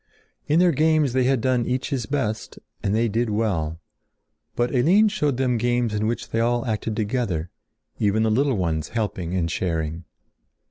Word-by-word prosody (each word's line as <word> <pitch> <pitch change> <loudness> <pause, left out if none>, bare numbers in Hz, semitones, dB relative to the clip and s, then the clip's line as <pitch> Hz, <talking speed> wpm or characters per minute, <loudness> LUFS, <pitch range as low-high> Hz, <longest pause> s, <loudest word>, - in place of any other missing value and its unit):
In 150 - +3
their 180 -1 +5
games 155 -2 +2
they 130 -1 +2
had 130 -2 +2
done 125 -1 +1
each 130 +4 -2
his 125 -5 -2
best 115 -7 -2 0.2
and 100 +1 0
they 115 +1 +2
did 115 +2 0
well. 90 -7 -1 0.8
But 120 +2 0
Eline 180 - +4
showed 150 - 0
them 125 -3 +1
games 120 -1 +1
in 105 +1 0
which 120 - -3
they 115 - 0
all 120 +1 +1
acted 110 -1 -2
together, 105 -7 -2 0.5
even 105 +1 +2
the 110 - +2
little 135 +1 +2
ones 80 -4 -1
helping 95 -6 -3
and 85 -3 0
sharing. 80 -1 -2
115 Hz, 175 wpm, -23 LUFS, 100-130 Hz, 0.8 s, their